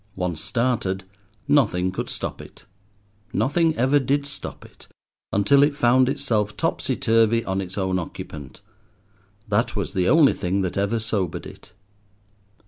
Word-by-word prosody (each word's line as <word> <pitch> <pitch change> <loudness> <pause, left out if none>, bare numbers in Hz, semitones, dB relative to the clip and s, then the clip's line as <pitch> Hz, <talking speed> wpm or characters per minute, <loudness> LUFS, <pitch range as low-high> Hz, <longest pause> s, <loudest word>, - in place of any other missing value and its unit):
Once 90 -4 -3
started 115 -6 -1 0.4
nothing 105 -11 +2
could 95 - -4
stop - - -5
it—nothing 100 - -3
ever 135 +4 +3
did 140 +2 0
stop 140 - -8
it, - - -17 0.4
until 140 +8 +4
it 145 0 +3
found 130 0 +4
itself 110 -7 -1
topsy - - -1
turvy 115 0 +2
on 95 +1 -1
its 95 0 -8
own 95 -1 0
occupant. 75 -4 -8 0.9
That 105 +3 0
was 95 -5 -3
the 90 -1 +1
only 155 -3 +6
thing 95 +1 -1
that 90 -2 -2
ever 100 +4 0
sobered 110 -5 -2
it. - - -13
105 Hz, 135 wpm, -23 LUFS, 95-130 Hz, 0.9 s, only